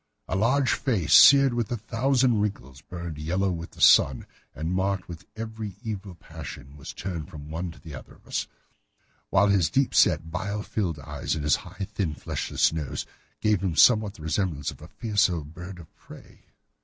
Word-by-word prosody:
A - - -2
large 130 +6 +2
face, 95 - 0
seared 140 -2 +8
with 120 -2 -2
a 120 - -1
thousand 120 +1 +1
wrinkles, 70 -10 -4
burned 85 -3 -7
yellow 90 +5 0
with 85 -1 -6
the - - -12
sun, 65 -3 +5 0.3
and 80 +4 -3
marked 95 0 -1
with 80 -4 -10
every 110 -3 -6
evil 100 -4 -6
passion, 70 -3 -10
was 70 - -8
turned 85 -6 -6
from 75 0 -10
one 85 +3 -3
to 80 - -12
the 80 - -11
other 65 - -10
of - - -25
us, - - -3 0.8
while 100 +1 +4
his 95 -5 +3
deep 135 - +1
set, 80 - +3
bile 100 +4 -3
shot 90 -9 -2
eyes, 70 +2 -4
and 75 - -4
his 75 - +3
high, 95 - -7
thin, 85 -7 -2
fleshless - - 0
nose, 75 -4 -4 0.4
gave 105 -3 +2
him 95 -5 -1
somewhat 105 +1 +5
the 75 - -12
resemblance 80 -3 -1
to - - -10
a - - -10
fierce 105 -4 +1
old 80 -4 -5
bird 90 +2 -9
of 80 -3 -15
prey. - - -16
95 Hz, 190 wpm, -26 LUFS, 80-105 Hz, 0.8 s, seared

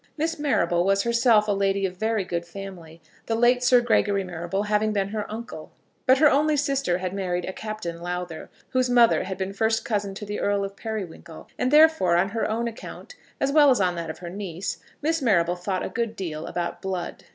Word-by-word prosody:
Miss 325 +1 -1
Marrable 175 - +1
was 195 +1 +2
herself 235 -2 +3
a - - +2
lady 195 0 +1
of 185 -1 -3
very 220 +1 0
good 175 -2 -3
family, 170 -3 -10 0.2
the 225 - 0
late 245 +2 +3
Sir 250 0 +5
Gregory 205 -4 +2
Marrable 175 +2 -3
having 210 +1 +1
been 200 -1 0
her 210 0 -4
uncle; 220 -8 -8 0.4
but 260 +1 +6
her 300 +2 +6
only 295 +2 +3
sister 275 -10 0
had 185 0 -4
married 180 -3 -2
a 190 - -5
Captain 200 -7 -6
Lowther, 175 -2 -5 0.2
whose 255 -1 +1
mother 240 -2 +4
had 190 -1 -5
been 190 0 -3
first 220 +2 0
cousin 205 -3 -2
to 210 - -7
the 205 0 -4
Earl 200 0 +1
of 195 0 -5
Periwinkle; 195 -7 -7
and 250 - 0
therefore 300 - +5
on 185 +3 +2
her 225 +2 -2
own 230 +2 -1
account, 235 - -9 0.3
as 275 - +1
well 295 -1 +6
as 255 - +4
on 180 -2 +2
that 170 -2 -5
of 160 - -6
her 175 -1 -8
niece, 190 -2 -5 0.2
Miss 325 +1 +1
Marrable 175 -8 +2
thought 185 +1 -3
a - - -4
good 230 -2 -3
deal 165 -6 -5
about 175 -1 -4
blood. 190 -2 -5
200 Hz, 210 wpm, -25 LUFS, 180-235 Hz, 0.4 s, but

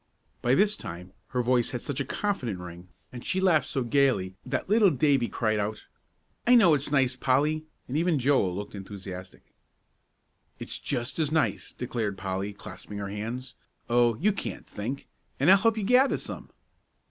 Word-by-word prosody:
By 120 +2 +3
this 205 +4 +3
time 90 - -8
her 125 -1 -1
voice 120 -1 +2
had 125 - -5
such 145 -2 -3
a 140 - -1
confident 130 - -2
ring, 90 0 -9 0.3
and 120 - -8
she 190 - 0
laughed 170 -7 +3
so 135 - -1
gayly, 120 -7 +2
that 130 0 -3
little 210 0 +5
Davie 140 -4 +2
cried 110 -2 0
out, 105 +1 -3 0.6
"I 250 - +7
know 190 -9 +7
it's 145 -1 0
nice, 130 -3 +3
Polly," 145 +5 +1 0.2
and 130 - -5
even 165 0 +2
Joel 130 -9 +2
looked 105 +1 -6
enthusiastic. 95 -2 -9 1.0
"It's - - -2
just 120 +7 -3
as 155 -2 +1
nice," 150 -10 0
declared 115 -5 -3
Polly, 95 +1 -3
clasping 105 0 -9
her 100 -1 -4
hands. 115 +6 -5 0.4
"Oh, 120 -1 +4
you 205 +6 +2
can't 190 - -5
think! 120 +7 -5 0.3
And 145 +7 +5
I'll 195 - +9
help 225 +2 +2
you 215 - -1
gather 250 +6 +4
some." - - -7
125 Hz, 170 wpm, -27 LUFS, 105-155 Hz, 1.0 s, I'll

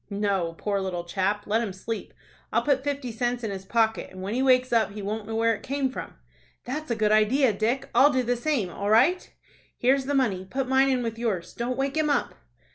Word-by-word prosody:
"No, 200 -5 -1
poor 200 -1 -1
little 180 -2 -3
chap! 195 +4 -1
Let 220 +2 +1
him 220 -4 -3
sleep. 205 +4 -6 0.4
I'll - - +2
put 275 -2 +1
fifty 280 -3 -3
cents 240 +2 -2
in 220 - -2
his 190 -1 -6
pocket, 225 +1 +1
and 185 0 -9
when 200 +3 -3
he 255 - 0
wakes 255 -1 +3
up 220 -4 +2
he 210 - -6
won't 210 +1 -4
know 225 - -4
where 230 0 +3
it 215 - -6
came 275 -1 -1
from." - - -7 0.5
"That's 300 +4 -4
a 235 - +1
good 215 -1 +1
idea, 220 +4 +4
Dick. 240 +7 -1
I'll 290 +2 +6
do 260 -2 +1
the 245 +1 0
same. 240 - -1
All 200 +4 -3
right." 260 - +3 0.5
"Here's 265 +2 +2
the 285 +1 -1
money. 215 -9 +1
Put 270 -1 -2
mine 265 +1 +4
in 255 -2 +1
with 230 -1 -4
yours. 205 -8 -2
Don't 245 +2 -3
wake 275 +1 -1
him 310 -1 +2
up." 285 - 0
230 Hz, 230 wpm, -26 LUFS, 205-265 Hz, 0.5 s, I'll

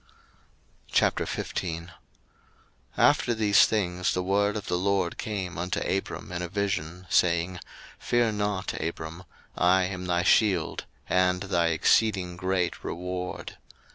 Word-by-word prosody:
01:015:001 85 -1 -1 1.1
After 120 - +3
these 105 -2 +5
things 90 -4 0
the 90 - -1
word 100 +2 +1
of 105 - -6
the - - -1
LORD 95 -2 0
came 95 -5 -4
unto 90 +1 -1
Abram 95 -1 -3
in 90 0 -3
a 90 - -4
vision, 90 -3 -2
saying, 85 +1 +2 0.4
Fear 120 -2 +1
not, 105 -2 -2
Abram: 80 +2 -5 0.3
I 90 +1 +4
am 90 0 -4
thy 90 0 +1
shield, 95 -4 +2 0.2
and 90 +1 +2
thy 90 -4 +1
exceeding 90 +2 +2
great 90 -1 -1
reward. 90 +1 -5
90 Hz, 120 wpm, -27 LUFS, 90-100 Hz, 1.1 s, these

